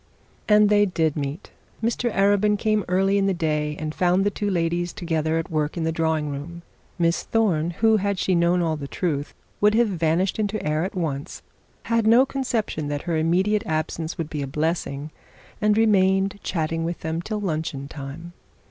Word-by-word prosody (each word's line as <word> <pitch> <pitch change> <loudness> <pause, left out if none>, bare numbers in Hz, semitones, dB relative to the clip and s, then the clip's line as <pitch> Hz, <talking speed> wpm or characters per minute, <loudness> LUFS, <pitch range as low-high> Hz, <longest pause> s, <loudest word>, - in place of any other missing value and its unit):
And 210 0 +6
they 205 0 +4
did 160 -4 0
meet. 145 +5 -5 0.3
Mr 235 +1 0
Arabin 205 +1 +3
came 215 -1 +1
early 195 +2 +2
in 195 - +2
the 195 - +1
day, 150 -3 -1
and 155 0 -4
found 180 +2 +2
the 205 - +2
two 205 0 -2
ladies 175 -1 -1
together 160 -2 -1
at 165 +1 -4
work 155 +1 -1
in 165 - -1
the 160 - 0
drawing 160 -2 0
room. 160 +5 -7 0.3
Miss 170 -1 +1
Thorne, 180 -8 +1
who 220 +5 +3
had 200 -1 -1
she 185 - +1
known 175 +1 +3
all 160 -1 0
the 145 -2 -6
truth 145 -3 -3 0.2
would 210 +1 +4
have 235 -1 +3
vanished 175 +2 0
into 215 0 -1
air 155 +1 0
at 190 - -4
once, 150 -6 -4 0.4
had 230 -1 +1
no 240 +4 +6
conception 235 - -2
that 145 0 -3
her 170 -2 -1
immediate 185 +6 +2
absence 160 +1 -2
would 160 -3 -4
be 150 - -3
a 140 - -3
blessing, 150 0 -2 0.5
and 210 0 +3
remained 195 -2 +3
chatting 165 -1 -2
with 170 +1 -4
them 160 +1 -2
till 215 +4 -4
luncheon 155 -7 -3
time. 150 +4 -8
170 Hz, 185 wpm, -24 LUFS, 155-205 Hz, 0.5 s, And